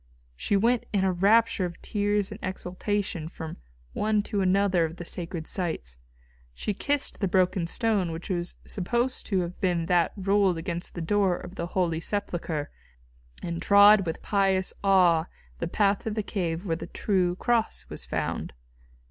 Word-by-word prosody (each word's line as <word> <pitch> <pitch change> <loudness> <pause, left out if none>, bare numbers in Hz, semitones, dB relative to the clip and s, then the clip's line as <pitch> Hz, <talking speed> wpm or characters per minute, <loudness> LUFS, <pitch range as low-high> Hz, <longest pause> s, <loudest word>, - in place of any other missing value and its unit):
She 200 - +1
went 235 +4 +2
in 200 -2 +1
a 190 - +3
rapture 205 +3 +3
of 175 -2 -4
tears 205 -1 0
and 210 - -7
exaltation 185 -2 -3
from 160 -2 -7 0.4
one 215 -1 +1
to 205 -1 -2
another 190 -1 +3
of 160 0 -3
the 175 - -8
sacred 170 -2 -4
sites. 65 - -3 0.6
She 210 - -2
kissed 285 +7 -1
the 195 - +1
broken 185 -1 +2
stone 205 -4 0
which 165 +1 -6
was 175 -1 -2
supposed 240 +7 -1
to 190 -3 +1
have 175 +1 -6
been 175 -3 +1
that 175 0 +2
rolled 195 -2 +2
against 170 +1 -4
the 170 - -3
door 190 0 +2
of 180 - -9
the 170 -3 -4
Holy 175 -3 0
Sepulchre, 170 -5 -3 0.7
and 170 -1 -3
trod 200 -1 +7
with 165 - -4
pious 195 -2 +1
awe 180 -5 +4 0.3
the - - -2
path 200 +3 +2
to - - -4
the 215 0 -2
cave 175 -3 -3
where 165 -4 0
the - - -7
True 180 -4 0
Cross 235 +2 0
was - - -5
found. - - -3
185 Hz, 165 wpm, -27 LUFS, 170-205 Hz, 0.7 s, trod